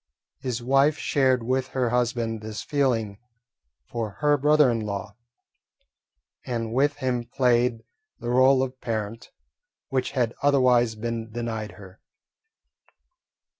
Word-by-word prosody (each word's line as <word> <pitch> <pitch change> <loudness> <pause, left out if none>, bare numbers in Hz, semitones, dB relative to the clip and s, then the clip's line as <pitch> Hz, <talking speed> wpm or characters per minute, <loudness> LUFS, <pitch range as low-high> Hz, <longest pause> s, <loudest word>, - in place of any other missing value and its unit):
His 125 -2 -4
wife 135 +4 +3
shared 130 -4 +2
with 130 +2 0
her 125 -3 -1
husband 120 -2 0
this 110 0 -6
feeling 115 -8 0 0.7
for 115 -2 -4
her 150 -1 +4
brother 150 -1 +4
in 115 - -1
law, 100 -1 -5 1.3
and 115 -2 -3
with 145 +3 +2
him 130 -4 -1
played 120 -1 +1 0.4
the 120 - -3
role 130 +1 +5
of 130 0 -6
parent, 110 -1 -4 0.6
which 130 -1 -1
had 120 -4 0
otherwise 125 -5 +3
been 115 0 -4
denied 110 -2 -4
her. 95 -1 -14
120 Hz, 120 wpm, -25 LUFS, 115-130 Hz, 1.3 s, role